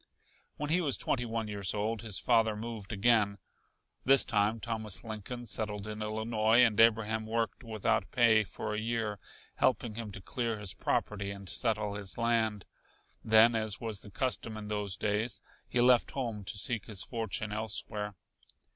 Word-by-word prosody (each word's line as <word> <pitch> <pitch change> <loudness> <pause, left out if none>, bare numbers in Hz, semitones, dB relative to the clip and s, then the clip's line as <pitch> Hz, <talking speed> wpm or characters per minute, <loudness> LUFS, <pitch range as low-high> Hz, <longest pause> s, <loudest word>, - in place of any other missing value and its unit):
When 150 +1 -3
he 180 +2 +3
was 145 -6 +5
twenty 120 -2 -1
one 115 -1 -3
years 100 -1 -2
old 110 +2 -1
his 110 -4 -1
father 115 -3 +3
moved 110 -1 -6
again. 105 -1 +3 0.7
This 135 +1 +6
time 110 -1 +1
Thomas 110 -3 -2
Lincoln 115 +2 -6
settled 105 -2 -2
in 105 0 -6
Illinois, 110 +1 +2
and 115 -3 +2
Abraham 110 -1 +3
worked 115 +2 -2
without 110 -3 0
pay 115 -3 +4
for 105 - -5
a 105 - -1
year, 110 -2 -2 0.4
helping 120 -3 +1
him 110 -1 -5
to - - -6
clear 115 +3 -3
his 105 -3 -4
property 100 -1 -1
and 100 -1 -8
settle 105 0 0
his 100 -2 -6
land. 115 -4 +1 0.6
Then, 110 +2 +6
as 110 -2 -1
was 110 -4 -3
the 105 - -11
custom 110 -1 -2
in 105 -1 -7
those 105 -3 -2
days, 105 0 -1 0.3
he 125 - 0
left 125 -1 +5
home 115 -7 -4
to 100 - -4
seek 115 +1 -1
his 105 -4 -5
fortune 115 -2 -3
elsewhere. 105 -1 +1
110 Hz, 165 wpm, -31 LUFS, 105-115 Hz, 0.7 s, This